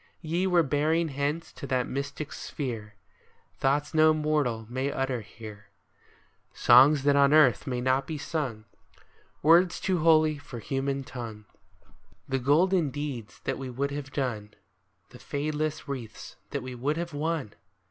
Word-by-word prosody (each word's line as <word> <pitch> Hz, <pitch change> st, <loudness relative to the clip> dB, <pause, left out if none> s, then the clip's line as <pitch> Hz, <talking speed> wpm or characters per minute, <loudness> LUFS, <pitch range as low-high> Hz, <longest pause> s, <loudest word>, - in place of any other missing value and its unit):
Ye 170 Hz, +4 st, 0 dB
were 175 Hz, -2 st, +4 dB
bearing 155 Hz, +3 st, +1 dB
hence 145 Hz, +4 st, -3 dB
to 140 Hz, -, -8 dB
that 130 Hz, -1 st, 0 dB
mystic 140 Hz, +2 st, -5 dB
sphere 115 Hz, -7 st, -5 dB, 0.6 s
Thoughts 145 Hz, +3 st, +1 dB
no 155 Hz, 0 st, +5 dB
mortal 150 Hz, -7 st, 0 dB
may 130 Hz, +4 st, -2 dB
utter 135 Hz, -3 st, -2 dB
here, 105 Hz, -1 st, -11 dB, 0.5 s
— -, -, -33 dB, 0.2 s
Songs 135 Hz, +4 st, +6 dB
that 140 Hz, 0 st, +4 dB
on 140 Hz, 0 st, +5 dB
earth 140 Hz, -9 st, +5 dB
may 125 Hz, -2 st, -2 dB
not 130 Hz, +2 st, +1 dB
be 155 Hz, -, -4 dB
sung, 140 Hz, -7 st, -4 dB, 0.4 s
— -, -, -34 dB
Words 170 Hz, +3 st, +5 dB
too 185 Hz, -3 st, 0 dB
holy 155 Hz, -2 st, +4 dB
for 140 Hz, -4 st, -9 dB
human 135 Hz, +3 st, -2 dB
tongue, 115 Hz, -5 st, -8 dB, 0.4 s
— -, -, -28 dB, 0.3 s
The 135 Hz, 0 st, -1 dB
golden 160 Hz, +5 st, +3 dB
deeds 135 Hz, -6 st, -6 dB
that -, -, -2 dB
we 135 Hz, -1 st, -5 dB
would 140 Hz, +3 st, -2 dB
have 140 Hz, -1 st, -6 dB
done, 110 Hz, -7 st, -3 dB, 0.3 s
— -, -, -44 dB
The -, -, -13 dB
fadeless 155 Hz, +1 st, -3 dB
wreaths 125 Hz, -6 st, -7 dB
that 140 Hz, -3 st, -4 dB
we 130 Hz, 0 st, -6 dB
would 140 Hz, +6 st, -1 dB
have 170 Hz, -1 st, -4 dB
won 150 Hz, -6 st, -2 dB
140 Hz, 160 wpm, -28 LUFS, 125-155 Hz, 0.6 s, Songs